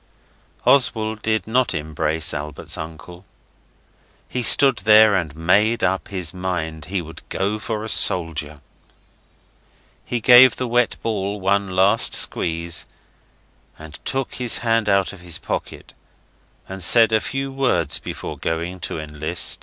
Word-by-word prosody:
Oswald 110 Hz, -5 st, +2 dB
did 110 Hz, 0 st, -1 dB
not 125 Hz, +2 st, 0 dB
embrace 80 Hz, +2 st, -1 dB
Albert's 75 Hz, +1 st, -5 dB
uncle. 80 Hz, +3 st, -9 dB, 1.0 s
He 125 Hz, -, -4 dB
stood 135 Hz, +1 st, +5 dB
there 110 Hz, +1 st, +5 dB
and 85 Hz, -6 st, -2 dB
made 100 Hz, +8 st, +1 dB
up 95 Hz, +1 st, 0 dB
his 90 Hz, -5 st, -5 dB
mind 85 Hz, -4 st, -4 dB
he 90 Hz, +1 st, -3 dB
would 80 Hz, +1 st, -12 dB
go 100 Hz, +3 st, -2 dB
for 110 Hz, -1 st, -4 dB
a -, -, -5 dB
soldier. 80 Hz, -7 st, +1 dB, 1.4 s
He 120 Hz, -, -3 dB
gave 125 Hz, +2 st, +7 dB
the 130 Hz, -, -4 dB
wet 120 Hz, 0 st, +1 dB
ball 105 Hz, -2 st, -3 dB
one 95 Hz, 0 st, -1 dB
last 100 Hz, +4 st, +4 dB
squeeze, 85 Hz, 0 st, -1 dB, 0.9 s
and 80 Hz, 0 st, -12 dB
took 135 Hz, -1 st, -3 dB
his 125 Hz, -2 st, -1 dB
hand 115 Hz, -2 st, +1 dB
out 100 Hz, -1 st, +1 dB
of 95 Hz, -, -13 dB
his 85 Hz, -2 st, -4 dB
pocket, -, -, -6 dB, 0.7 s
and 95 Hz, -1 st, -5 dB
said 115 Hz, +4 st, +5 dB
a 110 Hz, 0 st, +2 dB
few 135 Hz, 0 st, -4 dB
words 130 Hz, -, 0 dB
before -, -, -7 dB
going 85 Hz, +3 st, -4 dB
to 80 Hz, -1 st, -4 dB
enlist. 75 Hz, +2 st, -2 dB
95 Hz, 140 wpm, -21 LUFS, 80-110 Hz, 1.4 s, gave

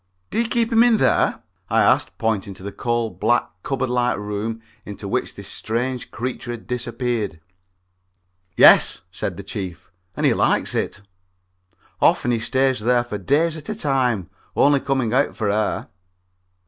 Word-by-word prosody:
"Do 230 Hz, -, +1 dB
you 235 Hz, -, -1 dB
keep 235 Hz, 0 st, +2 dB
him 225 Hz, 0 st, +5 dB
in 240 Hz, -2 st, +5 dB
there?" -, -, +2 dB, 0.3 s
I -, -, +3 dB
asked, -, -, +2 dB
pointing 110 Hz, -3 st, -1 dB
to 95 Hz, -, -13 dB
the 100 Hz, -, -5 dB
coal 120 Hz, 0 st, -1 dB
black 120 Hz, 0 st, +1 dB
cupboard 130 Hz, 0 st, -2 dB
like 125 Hz, 0 st, +1 dB
room 105 Hz, +2 st, -4 dB, 0.2 s
into 105 Hz, 0 st, -8 dB
which -, -, -2 dB
this -, -, -9 dB
strange 125 Hz, +3 st, -3 dB
creature 120 Hz, 0 st, -5 dB
had 120 Hz, -2 st, -6 dB
disappeared. 120 Hz, -7 st, -3 dB, 1.2 s
"Yes," -, -, +7 dB
said 95 Hz, -1 st, -4 dB
the 100 Hz, -, -7 dB
Chief, 95 Hz, -3 st, -7 dB, 0.3 s
"and -, -, 0 dB
he -, -, +5 dB
likes -, -, +1 dB
it. 105 Hz, -, -2 dB, 1.0 s
Often 120 Hz, -, +3 dB
he 115 Hz, -, +1 dB
stays 130 Hz, +2 st, +1 dB
there 120 Hz, +2 st, +2 dB
for 105 Hz, -4 st, -6 dB
days 155 Hz, -, +1 dB
at 155 Hz, +2 st, -9 dB
a 215 Hz, -, -2 dB
time, 130 Hz, -, 0 dB, 0.2 s
only 140 Hz, 0 st, +4 dB
coming 130 Hz, -4 st, -1 dB
out 135 Hz, +3 st, +2 dB
for 105 Hz, -3 st, 0 dB
air." 105 Hz, +1 st, -1 dB
120 Hz, 160 wpm, -22 LUFS, 105-135 Hz, 1.2 s, Yes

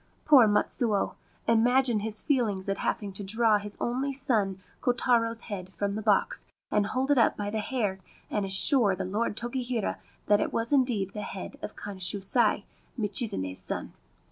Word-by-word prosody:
Poor 270 Hz, -7 st, +7 dB
Matsuo! 210 Hz, 0 st, +1 dB, 0.3 s
Imagine 240 Hz, +1 st, +4 dB
his 215 Hz, 0 st, -5 dB
feelings 215 Hz, -9 st, 0 dB
at 195 Hz, -, -1 dB
having 205 Hz, -3 st, -2 dB
to 200 Hz, -, -5 dB
draw 220 Hz, +1 st, +3 dB
his 205 Hz, 0 st, -8 dB
only 260 Hz, +4 st, -1 dB
son 220 Hz, -8 st, 0 dB, 0.2 s
Kotaro's 235 Hz, -2 st, +1 dB
head 190 Hz, -4 st, -7 dB
from 200 Hz, 0 st, -1 dB
the 210 Hz, +2 st, -3 dB
box, 220 Hz, -, +1 dB, 0.2 s
and 210 Hz, -1 st, +2 dB
hold 260 Hz, +5 st, -1 dB
it 280 Hz, -, +4 dB
up 230 Hz, -, +3 dB
by 205 Hz, 0 st, -3 dB
the 220 Hz, -, -1 dB
hair, 210 Hz, -4 st, -2 dB, 0.3 s
and 210 Hz, -, -1 dB
assure 195 Hz, +2 st, +5 dB
the 190 Hz, 0 st, -4 dB
Lord 210 Hz, +3 st, -2 dB
Tokihira 240 Hz, -2 st, -2 dB, 0.3 s
that 205 Hz, 0 st, +3 dB
it -, -, -1 dB
was 230 Hz, +4 st, -1 dB
indeed 240 Hz, -8 st, +2 dB
the 210 Hz, -, -5 dB
head 195 Hz, -2 st, -7 dB
of -, -, -7 dB
Kanshusai, 200 Hz, +3 st, 0 dB, 0.3 s
Michizane's 200 Hz, -, -1 dB
son -, -, -4 dB
215 Hz, 165 wpm, -28 LUFS, 200-240 Hz, 0.3 s, Poor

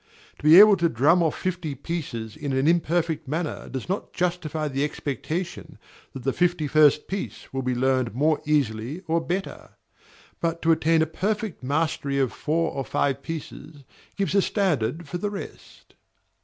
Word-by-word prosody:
To -, -, -16 dB
be 155 Hz, +3 st, +8 dB
able 210 Hz, -1 st, +8 dB
to 170 Hz, -1 st, +2 dB
drum 150 Hz, +9 st, +3 dB
off 160 Hz, -3 st, 0 dB
fifty 175 Hz, -5 st, -3 dB
pieces 135 Hz, -7 st, -5 dB
in 145 Hz, -3 st, -4 dB
an 135 Hz, +2 st, +1 dB
imperfect 165 Hz, -2 st, +1 dB
manner 155 Hz, +3 st, -3 dB
does 130 Hz, -2 st, -5 dB
not 190 Hz, +3 st, -3 dB
justify 170 Hz, -4 st, -1 dB
the 140 Hz, 0 st, -1 dB
expectation 150 Hz, +4 st, -4 dB, 0.4 s
that 130 Hz, -, -8 dB
the 135 Hz, +1 st, 0 dB
fifty 175 Hz, -3 st, +1 dB
first 150 Hz, 0 st, +4 dB
piece 160 Hz, -, -6 dB
will 135 Hz, -, -1 dB
be 125 Hz, -1 st, -1 dB
learned 130 Hz, -2 st, +1 dB
more 150 Hz, +3 st, +2 dB
easily 140 Hz, 0 st, -1 dB
or 165 Hz, -2 st, 0 dB
better; 185 Hz, +4 st, -5 dB, 0.6 s
but 165 Hz, 0 st, -1 dB
to 165 Hz, -, +4 dB
attain 160 Hz, 0 st, +3 dB
a -, -, +1 dB
perfect 205 Hz, +4 st, -3 dB
mastery 140 Hz, 0 st, -1 dB
of 135 Hz, -3 st, +1 dB
four 165 Hz, +2 st, -1 dB
or 135 Hz, -, -3 dB
five 140 Hz, +1 st, -1 dB
pieces 150 Hz, -1 st, -8 dB, 0.3 s
gives 195 Hz, -1 st, -1 dB
a 200 Hz, -, +5 dB
standard 165 Hz, -, 0 dB
for 175 Hz, +4 st, -4 dB
the 205 Hz, -, -1 dB
rest. 200 Hz, -1 st, -10 dB
155 Hz, 170 wpm, -25 LUFS, 140-175 Hz, 0.6 s, be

